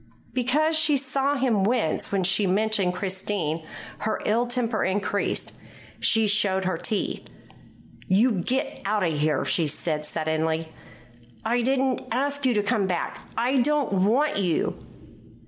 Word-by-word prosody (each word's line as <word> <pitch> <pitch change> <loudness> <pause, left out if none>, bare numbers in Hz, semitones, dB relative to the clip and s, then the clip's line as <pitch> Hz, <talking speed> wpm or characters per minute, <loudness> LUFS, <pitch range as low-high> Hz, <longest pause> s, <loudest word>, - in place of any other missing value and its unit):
Because 295 +6 +2
she 310 -2 +3
saw 275 +1 0
him 240 -7 +1
wince 220 -6 0
when 195 -2 +1
she 195 +2 +2
mentioned 195 -1 +1
Christine, 185 -4 -2 0.4
her 220 - -1
ill 235 +3 +2
temper 240 -3 -1
increased. 200 +1 -1 0.5
She 225 -1 +3
showed 200 -2 +2
her 185 -2 0
teeth. 210 +5 -3 0.8
"You 210 +7 +4
get 230 +7 -2
out 205 0 0
of 165 -2 +1
here," 150 -1 +1
she 165 -3 +2
said 150 +1 -2
suddenly. 160 0 -1 0.7
"I 240 +1 +2
didn't 265 +1 +1
ask 280 +3 0
you 245 - +2
to 210 - +2
come 205 -2 +1
back. 180 -2 -2 0.2
I 250 +4 +2
don't 285 -2 +1
want 220 +11 +2
you." 175 -5 0
210 Hz, 140 wpm, -25 LUFS, 185-255 Hz, 0.8 s, You